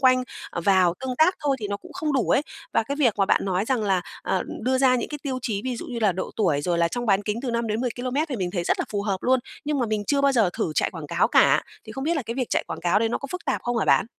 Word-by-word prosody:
quanh 255 -1 +5 0.4
vào 185 -3 +4
tương 260 -1 -3
tác 340 +4 +5
thôi 285 -3 +1
thì 210 - -3
nó 200 - -2
cũng 335 - -14
không 315 -5 -2
đủ 265 -4 +1
ấy. - - +4 0.3
Và - - +3
cái 280 +6 -4
việc 245 -8 +3
mà 195 - +3
bạn - - +2
nói 190 0 0
rằng 250 -1 0
là, 195 -3 +2 0.2
ờ, 185 - 0 0.2
đưa 260 +3 +1
ra 255 -1 +4
những 235 - -3
cái 295 - -5
tiêu 265 -3 -2
chí, 210 -4 -1
ví 255 -2 -2
dụ - - -7
như 240 -2 -5
là 210 -4 +3
độ 185 - -4
tuổi, 165 -10 +2
rồi 175 +1 0
là 170 0 +3
trong 240 +6 -3
bán 200 -1 +3
kính 210 +2 -2
từ 260 - -2
5-10km 245 +5 -1
thì 260 - -3
mình 180 -3 -2
thấy 175 -2 -2
rất - - +1
là - - 0
phù 205 -1 -1
hợp 200 -2 0
luôn. 260 +1 +3 0.3
Nhưng 295 -1 0
mà 245 - +1
mình 215 -1 -1
chưa 285 -1 +2
bao 280 0 +4
giờ 225 -8 +3
thử 160 - -2
chạy - - +1
quảng - - -7
cáo - - +2
cả, - - +5 0.2
thì - - -9
không 270 - -5
biết 335 +2 +1
là 285 - -1
cái 230 - -3
việc 255 -2 -2
chạy - - +1
quảng - - -6
cáo 175 +4 +3
đấy 225 0 +1
nó - - -1
có 280 - -6
phức 360 - -5
tạp 270 - -1
không 240 0 -1
hả - - +1
bạn? - - +4
235 Hz, 315 wpm, -24 LUFS, 200-265 Hz, 0.4 s, quanh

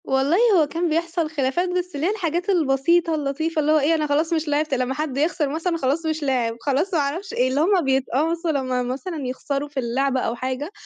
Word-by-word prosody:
والله 270 +5 +2 0.2
هو 300 - +2
كان 335 +3 -1
بيحصل 330 0 -1
خلافات 305 +4 0
بس 360 -2 -3
اللي 285 +3 -1
هي - - +2
الحاجات 355 -2 -2
البسيطة 330 0 +2
اللطيفة 310 +3 -2
اللي 300 +1 +2
هو 310 - +5
إيه، 305 +3 +2
أنا 305 -1 -1
خلاص 310 +3 +1
مش 320 -1 -1
لعبت 295 0 0
لمّا 255 0 0
حد 290 -2 -3
يخسر 305 0 +1
مثلًا 330 +3 -1
خلاص 290 +3 -1
مش 315 -1 -2
لاعِب، 245 -4 0
خلاص 295 +7 0
ما 330 - +3
أعرفش 320 +8 -3
إيه، 250 - +2
اللي 275 +3 +1
هم 370 +2 +3
بِيتقمصوا 300 +6 0
لمّا 255 -3 -1
مثلًا 270 +4 -4
يخسروا 280 +3 -3
في 285 -2 -4
اللعبة 265 +2 0
أو 235 - -1
حاجة، 260 +6 -4
300 Hz, 215 wpm, -22 LUFS, 270-330 Hz, 0.2 s, هو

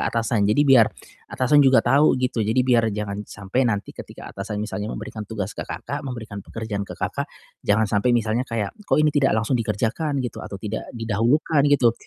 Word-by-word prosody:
atasan. 115 -3 +1
Jadi 145 +8 +3
biar 130 -5 +6 0.4
atasan 145 +3 +3
juga 135 -1 +5
tahu, 140 0 +4
gitu. 125 -2 -1
Jadi 115 +4 +2
biar 120 -3 +3
jangan 105 -1 -3
sampai 100 +6 -2
nanti 105 -3 -2
ketika - - -10
atasan 100 +2 -5
misalnya 105 0 -4
memberikan 110 - -6
tugas 105 -2 -4
ke - - -7
Kakak, 145 +1 -5
memberikan 115 -7 -6
pekerjaan 110 -1 -5
ke - - -8
Kakak, - - -3 0.3
jangan 105 +2 +2
sampai 110 +4 +2
misalnya 115 +3 -1
kayak, 110 -4 -2 0.2
"Kok - - +3
ini 150 0 +3
tidak 135 -6 +2
langsung 110 +4 -1
dikerjakan?" 115 +6 -1
Gitu 120 - -5
atau 100 - -7
tidak 105 +2 -5
didahulukan, 120 +8 +1
gitu. 130 -5 +4
115 Hz, 185 wpm, -23 LUFS, 105-130 Hz, 0.4 s, biar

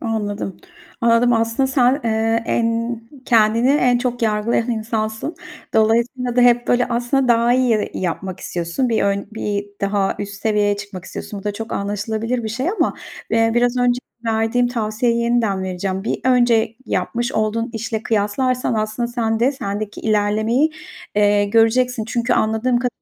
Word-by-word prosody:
Anladım. 210 -4 -3 0.4
Anladım 235 +1 +4
aslında 230 +3 +1
sen, 260 +1 +2
eee, 225 0 +1
en 230 0 0 0.2
kendini 230 +2 +3
en 250 -4 +3
çok 245 -1 -2
yargılayan 225 +2 +1
insansın. 220 +5 -3 0.4
Dolayısıyla 235 +3 +1
da - - +5
hep 240 0 +4
böyle 245 0 +3
aslında 245 +2 0
daha 235 0 +4
iyi 255 0 +2
ye 215 -2 +1
yapmak 185 +1 -3
istiyorsun. 175 +9 -2
Bir 225 -2 +1
ön 200 0 0
bir 205 -2 -3
daha 200 -1 0
üst 200 0 -5
seviyeye 210 -2 +2
çıkmak 195 -3 -8
istiyorsun. 205 - -7
Bu - - -17
da 205 - -1
çok 225 +2 -6
anlaşılabilir 220 +4 -2
bir - - -2
şey 255 +8 -2
ama, 435 - 0 0.4
eee, 225 0 +3
biraz 245 +1 +2
önce 245 0 +2 0.3
verdiğim 225 +2 +1
tavsiyeyi 235 0 0
yeniden 230 -5 +1
vereceğim. 190 +1 -3
Bir - - -2
önce 240 -3 +3
yapmış 240 +2 -1
olduğun 225 +2 -1
işle 225 -1 -3
kıyaslarsan 230 +4 0
aslında 215 +2 -1
sen 225 -2 -1
de 255 +4 +3
sendeki 210 -5 -5
ilerlemeyi, 220 +6 +1 0.4
eee, 205 0 +3
göreceksin. 225 +3 +2
Çünkü 235 +2 -1
anladığım 220 +3 +1
ka 250 +1 0
225 Hz, 155 wpm, -20 LUFS, 210-245 Hz, 0.4 s, da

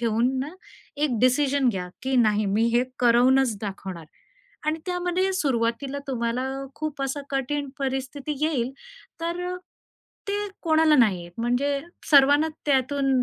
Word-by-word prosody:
ठेवून 240 +3 +1
ना, 300 +6 -5 0.4
एक 285 -6 0
डिसिजन 270 +1 +3
घ्या, 185 -5 -2
की 265 0 0
नाही 210 -1 +1
मी 210 +4 +2
हे 250 - +3 0.2
करवूनच 245 0 +4
दाखवणार. 190 -4 -6 0.6
आणि 315 +1 +1
त्यामध्ये 360 +1 0
सुरुवातीला 270 -2 0
तुम्हाला 235 0 -1 0.3
खूप 305 -2 -5
असा 270 +2 -2
कठीण 275 +1 -1
परिस्थिती 270 +2 -3
येईल. 260 -6 0 0.5
तर 340 +1 -2
अ, - - -5 0.7
ते - - 0 0.3
कोणाला 315 -2 +4
नाही 200 -8 +3
येत 175 0 -12
म्हणजे 275 +4 +1 0.3
सर्वांना 285 +2 +6 0.2
त्यातून 270 -1 +2
265 Hz, 130 wpm, -25 LUFS, 235-290 Hz, 0.7 s, सर्वांना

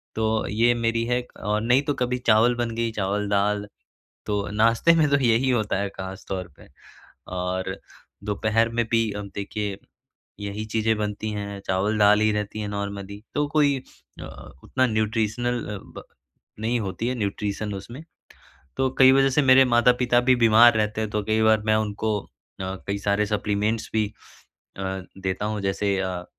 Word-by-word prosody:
तो 110 0 0
ये 115 +3 +3
मेरी 115 -1 0
है 125 +1 0
क 125 - -18
और 105 +1 0
नहीं 125 +4 +3
तो 145 - -1
कभी 125 -1 -1
चावल 115 +2 +5
बन 120 -1 -2
गई 115 0 -1
चावल-दाल 105 0 0 0.6
तो 105 -1 -1
नाश्ते 115 +9 +4
में 160 -2 +4
तो 140 - +4
यही 120 +3 +3
होता 110 -6 +1
है 100 - -2
ख़ास 95 0 -8
तौर 95 -2 -3
पे। - - -16 0.7
और 95 +1 -2 0.5
दोपहर 110 +2 +1
में 120 0 0
भी 115 -2 +2
अब 100 -1 -6
देखिए 100 0 -4 0.6
यही 100 +1 -4
चीज़ें 110 +1 0
बनती 105 +1 -3
हैं, 100 -1 -5
चावल-दाल 105 +2 +3
ही 110 0 +3
रहती 105 0 -3
है 105 - -3
नॉर्मली 100 0 -5
तो 145 0 +1
कोई 145 -2 +2 0.4
अ, - - -7 0.4
उतना 130 -1 +1
न्यूट्रिशनल 115 +2 -1
अ, 105 -1 -5 0.2
ब - - -8 0.6
नहीं 115 +2 0
होती 105 +3 -3
है 130 - -1
न्यूट्रिशन 105 0 -3
उसमें। 115 +9 -8 0.8
तो 135 0 +2
कई 130 0 +8
वज़ह 135 0 +4
से 135 +3 +2
मेरे 130 -1 +6
माता-पिता 120 0 +3
भी 130 - +7
बीमार 115 0 +6
रहते 105 0 -1
हैं 110 - -2
तो 105 0 -1
कई 110 +1 +1
बार 110 -1 +4
मैं 110 -1 +3
उनको 110 0 -1 0.4
अ, 95 0 -3
कई 100 0 -1
सारे 100 +1 +1
सप्लीमेंट्स 105 +1 -1
भी 110 -1 +1 0.7
अ, - - -6 0.4
देता 95 +1 -3
हूँ। 105 -1 -2
जैसे 100 0 0
अ, 90 -2 -3
110 Hz, 170 wpm, -24 LUFS, 100-120 Hz, 0.8 s, कई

